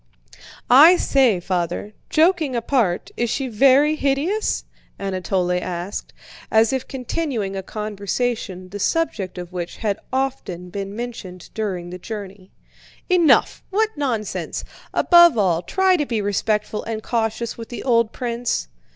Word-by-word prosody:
"I 300 +8 +8
say, 255 - +3
Father, 180 +3 -2 0.2
joking 320 -4 +3
apart, 230 -6 0
is 240 0 -1
she 270 +3 -1
very 275 +6 +4
hideous?" 305 +10 0 0.3
Anatole 185 -2 -1
asked, 180 +2 -5 0.4
as 220 +2 +4
if 260 -1 -2
continuing 250 -6 -3
a 190 - -3
conversation 210 -1 -3
the 205 +2 -7
subject 210 - -1
of 175 0 -7
which 175 -1 -5
had 210 -3 -1
often 255 -10 -3
been 200 +1 -5
mentioned 220 -7 -7
during 185 -5 -3
the 180 - -7
journey. 195 -2 -8 0.6
"Enough! 345 -4 +4
What 430 +3 +2
nonsense! 240 -8 -3 0.3
Above 345 -6 +6
all, 180 -5 +2
try 375 - +2
to 295 - 0
be 230 -3 -1
respectful 210 +1 -1
and 220 -1 -4
cautious 230 0 -1
with 230 -1 -9
the 240 - -6
old 230 -3 +2
prince." 240 -1 -2
225 Hz, 135 wpm, -21 LUFS, 195-270 Hz, 0.6 s, I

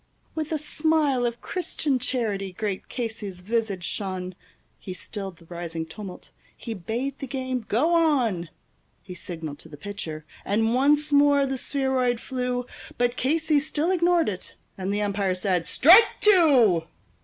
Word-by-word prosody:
With 310 -1 -4
a 315 - +1
smile 300 -4 +1
of 235 0 -5
Christian 310 -7 -2
charity 210 -7 -2
great 200 -1 -4
Casey's 220 -6 -5
visage 210 -2 -1
shone; 185 -1 -3 0.5
He 185 - -7
stilled 195 -1 -7
the 165 - -18
rising 165 -1 -5
tumult; 185 +3 -10 0.3
he 230 - -5
bade 235 +8 -4
the 275 - -5
game 255 -3 -3
go 300 +11 +2
on; 250 - +2 0.5
He 185 - -9
signaled 165 -5 -7
to - - -12
the 145 - -11
pitcher, 160 -4 -6 0.2
and 225 +3 +1
once 290 +3 +3
more 285 -1 +5
the 270 0 -2
spheroid 260 -3 0
flew, 250 -1 -2 0.3
But 245 0 +1
Casey 310 +3 +2
still 310 +3 -1
ignored 350 -2 +3
it; 185 -3 -5 0.2
and 190 0 -3
the 205 +1 0
umpire 200 -2 0
said, 180 -2 0
"Strike 365 - +8
two." 270 - +5
235 Hz, 150 wpm, -25 LUFS, 190-285 Hz, 0.5 s, Strike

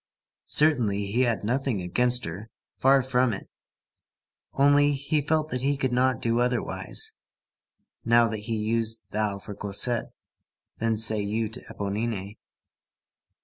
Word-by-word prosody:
Certainly, 120 -10 +2
he 120 +4 +1
had 120 -4 0
nothing 125 0 -1
against 125 +8 +1
her. 95 +7 -7 0.3
Far 135 0 +4
from 125 -2 +1
it. 95 - -6 1.1
Only, 145 +1 +4
he 145 +2 0
felt 155 +1 0
that 125 -3 -3
he 140 +1 0
could 130 -2 -1
not 125 0 +2
do 115 0 +1
otherwise, 125 -1 -1 0.9
now 120 0 +4
that 105 -1 -5
he 115 - 0
used 115 +1 -2
thou 105 -1 -1
to 100 +1 -9
Cosette, 105 +5 0 0.7
than 115 -1 0
say 110 -1 +3
you 110 +2 -2
to 120 +3 -7
Éponine. 105 0 -4
115 Hz, 135 wpm, -26 LUFS, 105-130 Hz, 1.1 s, Far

